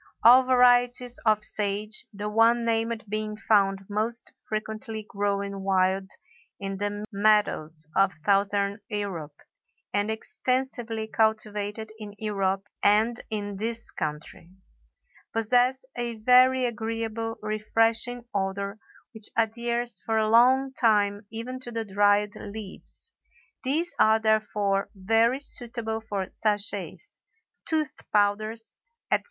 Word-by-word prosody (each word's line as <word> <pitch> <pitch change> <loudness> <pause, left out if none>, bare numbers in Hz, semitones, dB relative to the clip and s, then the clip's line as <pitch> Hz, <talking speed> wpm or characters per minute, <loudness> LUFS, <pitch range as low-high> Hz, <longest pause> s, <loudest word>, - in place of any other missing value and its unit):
All 245 +3 +9
varieties 245 -1 +3
of 215 -1 +4
sage, 210 +1 -3
the 205 0 -5
one 230 +2 +4
named 230 0 0
being 215 +1 -3
found 195 -3 +2
most 220 +3 -3 0.2
frequently 215 0 -4
growing 200 -1 -2
wild 190 0 +1 0.5
in 195 -1 -4
the 205 +1 -3
meadows 200 -7 +1
of 195 0 +4
Southern 200 0 +2
Europe, 190 -9 -4 0.6
and 205 +1 +1
extensively 235 0 -2
cultivated 215 -1 -1
in 205 -1 -8
Europe 195 -2 -1
and 220 +3 +3
in 205 -2 -4
this 230 +2 -3
country, 155 +2 -5 0.8
possess 245 +4 +2
a 240 -1 -3
very 255 +3 +5
agreeable, 225 -1 -3
refreshing 225 +3 0
odor 200 +1 -2 0.3
which 220 -2 -8
adheres 235 0 -1
for 225 -1 -1
a 215 0 +2
long 260 +3 +5
time 205 -3 +2
even 230 +4 -6
to 245 -2 -8
the 225 -1 -3
dried 205 +1 +3
leaves; 210 - -5 0.5
these 315 +6 0
are 220 0 +6
therefore 210 -2 +1
very 225 +6 +2
suitable 235 -5 -3
for 200 -4 -3
sachets, 205 - -2 0.5
tooth 310 -3 0 0.2
powders, 215 +2 0 0.4
etc. - - +4
215 Hz, 115 wpm, -26 LUFS, 205-230 Hz, 0.8 s, All